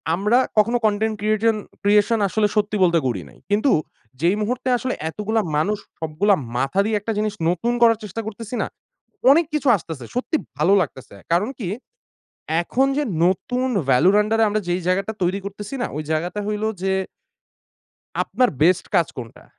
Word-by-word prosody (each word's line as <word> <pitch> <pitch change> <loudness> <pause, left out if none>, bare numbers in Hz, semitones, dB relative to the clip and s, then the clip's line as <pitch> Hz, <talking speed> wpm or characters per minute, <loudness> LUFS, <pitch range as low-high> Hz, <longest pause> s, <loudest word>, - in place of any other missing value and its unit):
আমরা 210 +7 +2 0.2
কখনো 230 +3 +4
content 215 +1 +1
creation 215 +1 +2 0.3
creation 210 +3 +3
আসলে 210 +2 +1
সত্যি 210 0 +1
বলতে 170 -2 +4
করি 110 -7 -2
নাই। - - -18
কিন্তু 215 +7 +3 0.5
যেই 175 +4 +3
মুহূর্তে 250 +4 -1
আসলে 255 +2 -2 0.2
এতগুলা 215 +5 -1 0.2
মানুষ 205 +8 +1 0.2
সবগুলা 165 +6 +2 0.2
মাথা 135 +9 0
দিয়ে 215 0 +1
একটা 225 +3 -3
জিনিস 215 -1 0 0.2
নতুন 230 +8 0
করার 230 -1 +6
চেষ্টা 210 +2 -5
করতেছি 225 +2 -6
না? - - -1 0.6
অনেক 330 +4 +5
কিছু 300 -2 -1
আসতেছে। 160 -8 -8
সত্যি 260 +5 0 0.2
ভালো 175 +7 +3
লাগতেছে। 130 - -6 0.2
কারণ 190 +8 +2
কি? 195 -7 -3 0.9
এখন 265 +9 +1
যে 295 - +2 0.2
নতুন 250 +8 0 0.2
ভ্যালুর 155 +10 +5
আন্ডারে 225 +1 +2
আমরা 215 0 0
যেই 175 +1 0
জায়গাটা 195 +4 0
তৈরি 185 +3 0
করতেছি 205 +5 -6
না? - - 0
ওই 155 - -3
জায়গাটা 175 +6 -1
হইলো 210 +1 -1 0.2
যে 190 0 +1 1.3
আপনার 250 -1 +1
বেস্ট 180 +2 +3
কাজ 170 -4 +4
কোনটা? 115 -2 -9
210 Hz, 160 wpm, -22 LUFS, 180-225 Hz, 1.3 s, করার